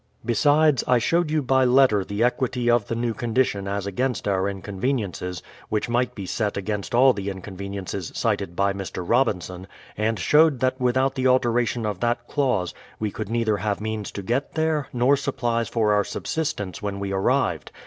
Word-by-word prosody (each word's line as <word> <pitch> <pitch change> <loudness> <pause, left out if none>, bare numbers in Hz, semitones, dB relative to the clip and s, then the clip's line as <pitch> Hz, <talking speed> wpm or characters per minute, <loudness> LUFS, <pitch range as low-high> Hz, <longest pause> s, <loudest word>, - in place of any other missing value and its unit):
Besides, 145 +4 +3
I 125 - +5
showed 165 +8 +1
you 155 -1 +1
by 130 +1 +3
letter 125 -5 +4
the 100 +4 -2
equity 125 0 +1
of 120 -4 +2
the 115 - -2
new 115 0 -1
condition 115 -3 0
as 100 0 -2
against 125 +4 -2
our 95 0 +1
inconveniences, 95 - -3 0.3
which 105 +2 -1
might 125 +1 0
be 100 - -6
set 105 +2 -2
against 105 +3 -3
all 130 +1 +6
the 100 -2 -4
inconveniences 100 -1 -6
cited 85 - -1
by 100 +1 +1
Mr. 95 -2 -6
Robinson, 95 -7 0 0.3
and 110 +1 0
showed 150 - +4
that 130 +1 0
without 130 +2 +2
the 130 0 0
alteration 120 -2 +2
of 105 -4 -3
that 120 +1 -1
clause, 125 - 0 0.3
we 105 -2 -2
could 105 0 -5
neither 115 -2 +1
have 105 0 -2
means 110 -1 -4
to 100 - -5
get 120 +8 -2
there, 160 -2 0
nor 125 +2 +3
supplies 120 -4 -1
for 110 -3 +2
our 105 0 +3
subsistence 105 - -3
when 100 -1 -3
we 100 0 -3
arrived. 95 - 0
115 Hz, 180 wpm, -24 LUFS, 100-130 Hz, 0.3 s, all